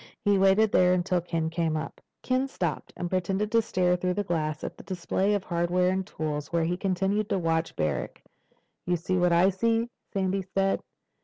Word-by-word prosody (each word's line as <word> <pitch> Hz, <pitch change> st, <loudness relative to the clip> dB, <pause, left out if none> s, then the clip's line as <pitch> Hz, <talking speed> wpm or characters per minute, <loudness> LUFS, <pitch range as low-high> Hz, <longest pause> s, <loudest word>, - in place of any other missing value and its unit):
He 205 Hz, -1 st, +4 dB
waited 195 Hz, +3 st, +4 dB
there 180 Hz, 0 st, +5 dB
until 180 Hz, 0 st, 0 dB
Ken 165 Hz, -2 st, -2 dB
came 165 Hz, -2 st, 0 dB
up. 155 Hz, -, -6 dB, 0.2 s
Ken 255 Hz, +1 st, +1 dB
stopped 175 Hz, -, -3 dB
and 175 Hz, -, -2 dB
pretended 190 Hz, +3 st, -1 dB
to 230 Hz, -, +4 dB
stare 180 Hz, -4 st, +1 dB
through 180 Hz, 0 st, -1 dB
the 205 Hz, -, 0 dB
glass 155 Hz, -5 st, -2 dB
at -, -, -4 dB
a -, -, -10 dB
display 190 Hz, +2 st, 0 dB
of 200 Hz, -, -2 dB
hardware 175 Hz, +1 st, +1 dB
and 190 Hz, 0 st, -2 dB
tools, 150 Hz, -1 st, -4 dB
while 170 Hz, -1 st, +1 dB
he 170 Hz, +2 st, 0 dB
continued 195 Hz, +2 st, 0 dB
to 195 Hz, -, +1 dB
watch 165 Hz, -2 st, 0 dB
Barrack. 75 Hz, -2 st, -2 dB, 0.6 s
"You 175 Hz, -, +2 dB
see 180 Hz, +2 st, -1 dB
what 180 Hz, 0 st, +3 dB
I 175 Hz, +3 st, +5 dB
see?" 230 Hz, +4 st, +1 dB, 0.2 s
Sandy 195 Hz, 0 st, 0 dB
said. 195 Hz, +1 st, 0 dB
180 Hz, 190 wpm, -27 LUFS, 170-195 Hz, 0.6 s, there